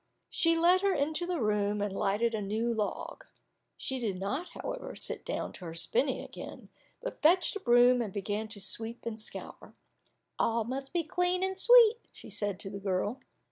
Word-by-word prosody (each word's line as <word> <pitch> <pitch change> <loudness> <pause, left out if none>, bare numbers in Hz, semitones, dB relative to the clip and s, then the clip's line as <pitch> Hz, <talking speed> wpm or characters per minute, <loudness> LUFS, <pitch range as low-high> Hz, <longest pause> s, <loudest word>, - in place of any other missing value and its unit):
She 330 0 +3
led 355 +3 +5
her 395 -1 +2
into 310 +5 -1
the 360 -2 -1
room 210 -2 +1
and 205 -1 -2
lighted 220 +5 +1
a 215 - -1
new 220 +4 -1
log. 220 - -4 0.5
She 265 -1 -3
did 205 -6 -2
not, 270 - -3
however, - - -5
sit - - -2
down - - -4
to 180 - -10
her 165 -1 -7
spinning 460 - 0
again, - - -10 0.3
but - - -6
fetched 350 +6 +4
a - - -3
broom 245 -3 +5
and 215 -4 -3
began 205 +2 -3
to 215 -1 -7
sweep 225 +5 0
and 225 -1 -4
scour, - - -7 0.7
"All 230 0 +2
must 265 +4 -5
be 345 -1 0
clean 360 +3 0
and 380 0 -1
sweet," 465 +2 +7 0.2
she - - -12
said 205 -3 -2
to 195 - -5
the 200 - -6
girl. 200 +5 -1
235 Hz, 185 wpm, -30 LUFS, 205-350 Hz, 0.7 s, sweet